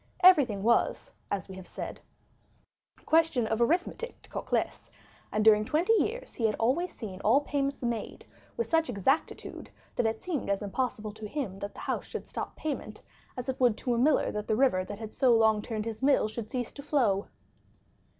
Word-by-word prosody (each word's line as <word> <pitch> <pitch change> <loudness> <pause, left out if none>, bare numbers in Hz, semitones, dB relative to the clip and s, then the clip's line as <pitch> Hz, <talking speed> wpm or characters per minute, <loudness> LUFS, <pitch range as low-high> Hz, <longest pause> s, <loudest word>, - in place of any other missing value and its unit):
Everything 275 - +6
was 235 +2 +2 0.2
as 195 -4 -2
we 190 - -9
have 185 - -10
said, - - -6 1.0
a - - -26
question 320 -7 +3
of 220 +1 -1
arithmetic 355 - 0
to - - -18
Cocles, - - -2 0.4
and 215 0 0
during 215 -1 +7
twenty 325 - +2
years 485 +2 0
he 225 - +1
had 215 - -1
always 275 +11 +1
seen 195 -4 -7
all 245 +7 +4
payments 280 -2 -2
made 235 -2 -3 0.3
with 470 - 0
such 325 -3 +1
exactitude, 245 - -1 0.3
that 235 - +2
it 220 0 -3
seemed 325 - -2
as 200 +1 0
impossible 215 0 -2
to 215 0 -8
him 210 -6 -4
that 200 +1 -6
the - - -9
house - - -2
should - - -6
stop - - -5
payment, 265 -8 -5 0.3
as 250 - -5
it 265 - -2
would 245 -4 +4
to 245 - -1
a 235 - +1
miller 285 +4 +3
that 210 0 -4
the 215 - +2
river 240 -7 +3
that 200 +2 -7
had 220 0 -8
so 250 -3 +4
long 220 -1 +4
turned 215 -1 -4
his 225 0 -5
mill 275 -5 +4
should 215 0 -6
cease 245 -2 -3
to 280 - -9
flow. 240 -9 +1
235 Hz, 195 wpm, -29 LUFS, 215-280 Hz, 1.0 s, during